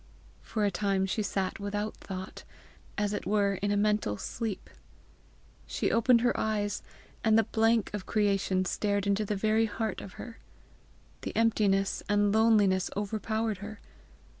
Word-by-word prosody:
For 215 -2 -1
a 200 - +1
time 195 0 0
she 195 +3 -1
sat 195 -2 -2
without 205 +1 -3
thought, 190 0 -7 0.5
as 210 0 0
it - - -4
were 200 -1 +2
in 205 - 0
a 205 - +1
mental 210 - +1
sleep. 220 - -4 1.0
She - - -1
opened 230 +1 +4
her 245 0 +2
eyes, 210 -1 -1 0.4
and 220 -1 +4
the 225 - +5
blank 225 0 +1
of 205 -3 -5
creation 195 -3 +1
stared 200 +1 0
into 200 +1 +1
the 210 - -1
very 220 +2 +2
heart 220 -1 -3
of 190 - -9
her. 235 -2 -9 0.8
The - - -5
emptiness 205 -4 +2
and 205 0 +3
loneliness 210 -4 +4
overpowered 220 0 -2
her. 210 +1 -8
205 Hz, 150 wpm, -29 LUFS, 200-220 Hz, 1.0 s, the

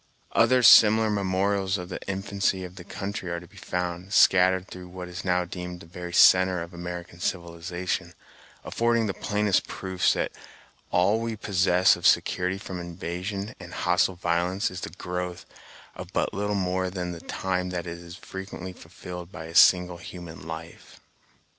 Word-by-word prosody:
Other 130 -1 +4
similar 110 -1 +8
memorials 95 0 0
of 90 -1 -7
the - - -6
infancy 95 -1 -1
of 90 0 -9
the 90 - -9
country 100 0 -5
are 85 0 -2
to 85 - -13
be - - -22
found, 90 +2 -4
scattered 95 0 +5
through 90 -1 -10
what 90 0 -8
is 90 +1 -7
now 90 -1 +1
deemed 90 0 -7
the - - -11
very 90 +1 -8
centre 90 0 +5
of 85 +2 -11
American 85 0 -7
civilization, 85 0 -3 0.5
affording 115 -1 +1
the 100 - -1
plainest 105 -1 0
proofs 95 -1 0
that - - -1 0.6
all 95 +5 +3
we 115 -1 -3
possess 95 -3 +3
of - - +2
security 90 +1 +2
from 95 -2 -7
invasion 90 +4 -5
and - - -9
hostile 90 +2 +2
violence 90 +4 0
is 90 0 -7
the - - -4
growth 90 +1 -5 0.5
of - - -9
but - - 0
little 105 +1 -1
more 95 -1 0
than 90 -1 -4
the 85 -1 -8
time 90 -1 -2
that 90 -1 -4
is 85 0 -8
frequently 95 -1 -8
fulfilled 90 +1 -9
by 80 - -8
a 80 - -9
single 90 0 +6
human 85 -3 -10
life. 80 +1 -9
90 Hz, 165 wpm, -26 LUFS, 90-95 Hz, 0.6 s, similar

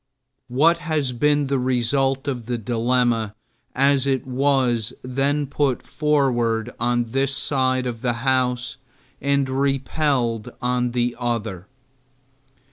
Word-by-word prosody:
What 155 +7 +3
has 150 -5 -1
been 145 +3 +2
the 135 -1 0
result 135 +2 +1
of 120 -5 -3
the 120 -1 -1
dilemma 115 -1 0 0.4
as 140 0 +3
it 135 0 0
was 130 -3 +1
then 140 +3 0
put 140 -2 -1
forward 125 -6 0
on 120 -1 0
this 135 +1 0
side 130 -2 0
of 120 -2 -4
the 125 -2 0
House 125 -1 0 0.4
and 140 -1 +1
repelled 135 -3 0
by 125 0 0
the 120 0 0
other? 110 -6 -3
130 Hz, 120 wpm, -22 LUFS, 120-140 Hz, 0.4 s, What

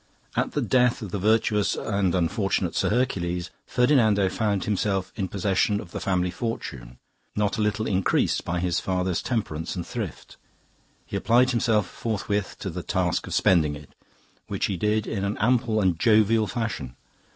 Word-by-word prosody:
At - - 0
the - - 0
death 125 -2 +2
of 100 - -7
the 100 - -2
virtuous 105 0 +2
and 100 -4 0
unfortunate 95 0 0
Sir - - +1
Hercules, 90 -7 -1 0.2
Ferdinando 110 -7 +3
found 100 -1 0
himself 100 -2 -1
in 100 -5 -2
possession 100 +1 +1
of 85 - -9
the - - -4
family 90 -2 0
fortune, 70 - -5 0.4
not 105 +1 0
a - - +2
little 105 +1 0
increased 95 -3 +1
by 90 +1 -2
his 90 -1 +1
father's 90 -1 -1
temperance 85 -10 -3
and 85 -2 -4
thrift; 105 - -6 0.7
he - - -6
applied 120 +5 +3
himself 110 -5 +2
forthwith 105 -2 -2
to - - -3
the - - -5
task 90 -2 -1
of - - -3
spending 80 -5 +3
it, 75 0 -13 0.5
which - - -1
he 100 - -1
did 105 +3 0
in 100 -3 -3
an 100 +1 -1
ample 115 -1 +2
and 90 -5 +1
jovial 110 0 +4
fashion. 100 - -4
100 Hz, 165 wpm, -25 LUFS, 90-110 Hz, 0.7 s, jovial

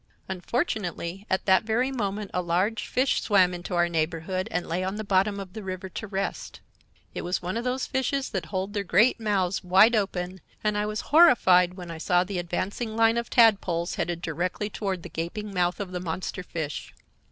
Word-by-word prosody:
Unfortunately 190 - -3
at 190 - 0
that 190 -1 +5
very 230 +4 0
moment 205 -4 -3
a 180 - +1
large 185 +6 0
fish 255 +1 +1
swam 185 -4 +4
into 175 +1 -5
our 175 0 +3
neighborhood 170 +3 -2
and 180 +1 -2
lay 175 +3 -1
on 190 +2 -2
the 215 - -4
bottom 200 0 +1
of 190 -2 -8
the 220 - -6
river 185 -1 -5
to 220 - -6
rest. 195 0 -4 0.5
It - - -4
was 180 +1 -2
one 180 +3 -3
of 230 - -2
those 255 +1 -1
fishes 265 +1 -1
that 180 -5 -3
hold 190 +4 -3
their 205 -2 -1
great 210 +7 +3
mouths 195 -4 0
wide 195 +6 +6
open, 190 -3 -2 0.2
and 210 -1 +1
I 210 0 0
was 215 0 -3
horrified 190 - +6
when 175 -2 -8
I 165 - -7
saw 180 +2 +3
the 185 -1 -4
advancing 200 +6 -3
line 225 +1 +4
of 235 - -6
tadpoles 195 -7 +3
headed 175 -1 -3
directly 180 +6 -2
toward 190 -5 -3
the - - -6
gaping 200 +5 -5
mouth 180 0 0
of 195 -3 -4
the 180 - -3
monster 180 +2 -4
fish. 160 -4 -5
190 Hz, 200 wpm, -26 LUFS, 180-215 Hz, 0.5 s, wide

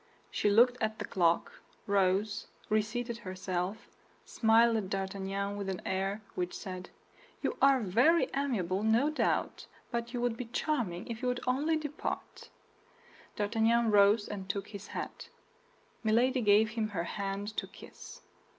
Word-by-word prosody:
She 210 - +1
looked 245 +4 +5
at 220 0 -1
the - - -4
clock, 170 -2 +1 0.3
rose, 200 +1 +1 0.2
reseated 230 +2 -1
herself, 185 +1 -4 0.4
smiled 230 +1 +4
at 195 -4 -3
D'Artagnan 195 +1 -3
with 200 -1 -3
an 185 -2 -3
air 195 +3 -1
which 180 0 -3
said, 185 -1 -7 0.5
"You - - 0
are 275 -2 +5
very 245 - +4
amiable, 205 -10 0
no 230 +7 +3
doubt, 310 - -1 0.2
but 235 -1 -2
you 245 - -3
would 240 -1 0
be 250 - -4
charming 230 - -2
if 230 0 -6
you 255 - -1
would 250 0 -1
only 290 +6 +1
depart." 300 -1 -5 0.9
D'Artagnan 225 +2 +2
rose 205 +1 +5
and 195 -2 -6
took 200 0 -3
his 200 -1 -8
hat; - - -6 0.7
Milady 245 +4 +3
gave 215 0 +5
him 220 -1 -1
her 190 -5 -3
hand 200 +3 -4
to - - -1
kiss. - - -12
215 Hz, 145 wpm, -31 LUFS, 195-235 Hz, 0.9 s, looked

